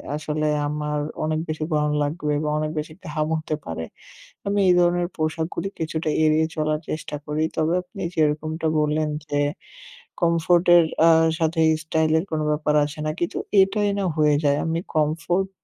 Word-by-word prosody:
আসলে 155 0 -2 0.2
আমার 150 0 -2 0.2
অনেক 155 0 0
বেশি 155 0 -3
গরম 150 0 +1
লাগবে 150 0 -2
বা 150 - -1
অনেক 155 0 -1
বেশি 155 +1 -6
ঘাম 155 0 -1
হতে 155 -1 -3
পারে। 80 0 -4 0.6
আমি 200 0 +1
এই 180 - +6
ধরনের 175 0 +2
পোশাকগুলি 160 +3 -2
কিছুটা 160 -1 -2
এড়িয়ে 155 0 +3
চলার 155 0 0
চেষ্টা 155 -1 -4
করি। 150 +1 -1
তবে 160 +1 +1
আপনি 185 +2 -11
যেরকমটা 155 +1 0
বললেন 150 +1 +1 0.2
যে, 145 -1 -2 0.8
কমফোর্ট 170 +1 +3
এর 170 - +5 0.2
আ - - +8 0.3
সাথে 160 0 +1 0.2
স্টাইল 160 0 +1
এর - - -2
কোনো 155 -1 -1
ব্যাপার 150 0 0
আসে 150 +1 -8
না 155 - 0
কি? 175 - +1
তো, - - -4 0.2
এটাই 205 +2 +2
না 195 - 0
হয়ে 150 -1 +4
যায়, 145 -1 +3
আমি 165 0 -1 0.2
কমফোর্ট 165 +5 0
155 Hz, 170 wpm, -23 LUFS, 150-165 Hz, 0.8 s, আ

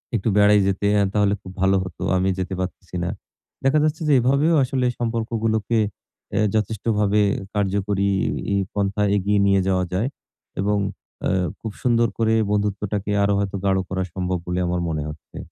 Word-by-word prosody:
একটু 110 0 0
বেড়াই 105 0 +6
যেতে 100 +1 -1
অ্যা 100 - +4
তাহলে 105 -1 +3
খুব 95 - -10
ভালো 95 0 +4
হতো। 95 -3 -9 0.2
আমি 95 +1 +1
যেতে 95 0 -3
পারতেসি 90 0 -5
না। 90 - -1 0.5
দেখা 135 +3 +4
যাচ্ছে 155 +1 0
যে 150 - +4
এভাবেও 140 +7 +3
আসলে 130 0 0
সম্পর্কগুলোকে 115 -1 0 0.5
অ্যা - - +1
যথেষ্টভাবে 105 -1 +1 0.3
কার্যকরী 100 0 0 0.4
ই - - +2 0.2
পন্থায় 100 0 0
এগিয়ে 100 +1 +1
নিয়ে 100 -1 +4
যাওয়া 95 -1 +1
যায় 105 +7 +1 0.5
এবং 105 +1 +1 0.4
অ্যা - - 0 0.3
খুব 110 - -5
সুন্দর 120 -1 +3
করে 110 -1 +2 0.2
বন্ধুত্বটাকে 105 0 -1
আরো 100 0 +2
হয়তো 100 -1 -2
গাঢ় 95 -1 +3
করা 95 0 -1
সম্ভব 90 -1 -1
বলে 90 +1 -1
আমার 90 0 -1
মনে 75 -2 -2
হচ্ছে। 75 0 -11
100 Hz, 160 wpm, -22 LUFS, 95-110 Hz, 0.5 s, বেড়াই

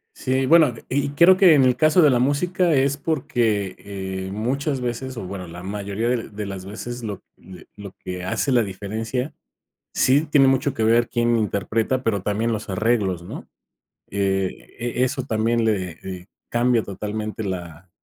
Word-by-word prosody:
Sí, 130 +1 0
bueno, 155 -4 +5
y 140 +1 0
creo 170 +6 +6
que 185 -5 +7
en 140 - +5
el 125 -1 +4
caso 155 +6 +4
de 150 - +6
la 125 - +3
música 170 +7 +1
es 140 -1 +2
porque, 120 - -1
eh, 95 -1 -5
muchas 130 +7 -1
veces, 125 +1 -4
o 115 - -5
bueno, 90 -1 -6
la 85 +1 -9
mayoría 100 +3 -3
de 120 -2 -1
de 105 0 -6
las 95 -2 -6
veces, 120 +4 -6
lo 105 -4 -5
de 90 -2 -14
lo 100 -2 -9
que 90 -1 -6
hace 95 +8 -1
la 125 -2 +4
diferencia, 110 +7 -4 0.6
sí 135 +3 +4
tiene 145 -2 +5
mucho 135 +2 +2
que 115 -3 -1
ver 115 +1 +3
quién 120 0 +1
interpreta, 110 +4 -1
pero, 100 -4 0
también 105 +3 0
los 110 -1 -4
arreglos, 100 -3 0
¿no? - - -8 0.6
Que, 95 -1 0 0.3
eh, 120 +1 0
eso 130 +1 -2
también 115 +1 +1
le 95 -6 -1
le 90 0 -8 0.2
cambia 120 -1 +2
totalmente 105 +2 -5
la 90 -2 -6
115 Hz, 175 wpm, -22 LUFS, 100-130 Hz, 0.6 s, que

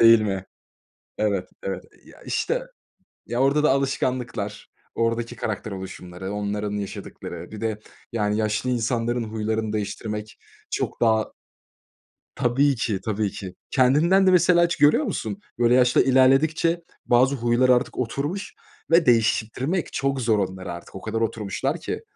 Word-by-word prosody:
Değil 115 -1 +8
mi? 95 -3 -2 0.7
Evet, 100 -4 0
evet, 95 - -4 0.2
ya, - - -17
işte, - - -1 0.7
ya, 120 +4 -1
orada 140 +2 +3
da 150 - +5
alışkanlıklar, 125 -6 -2 0.3
oradaki 115 +1 -1
karakter 110 0 -4
oluşumları, 95 0 -7
onların 105 0 -2
yaşadıkları 100 -2 -6
bir 105 0 -8
de 110 -2 -2 0.3
yani 105 -2 0
yaşlı 110 +3 0
insanların 120 0 0
huylarını 110 0 -2
değiştirmek 105 0 -4 0.3
çok - - -3
daha 110 -2 +2 1.0
Tabii 135 +4 +2
ki, 110 -4 -1
tabii 105 -2 -1
ki 95 -3 -7 0.2
kendinden 155 +9 +4
de - - +6
mesela 175 -1 +5
hiç 170 0 +1
görüyor 150 - +5
musun? 200 -4 -3 0.2
Böyle 120 0 +4
yaş 125 -1 +4
da - - +7
ilerledikçe 140 +6 +3 0.2
bazı 130 +3 +4
huylar 120 +1 +2
artık 125 -1 +2
oturmuş 145 - -3 0.4
ve 165 0 +5
değiştirtmek 120 - +1
çok 135 -1 0
zor 110 -3 +2
onlar 95 -1 -3
artık, 85 0 -8
o 95 - -7
kadar 110 +2 -3
oturmuşlar 115 - -2
ki. - - -4
115 Hz, 140 wpm, -24 LUFS, 105-135 Hz, 1.0 s, Değil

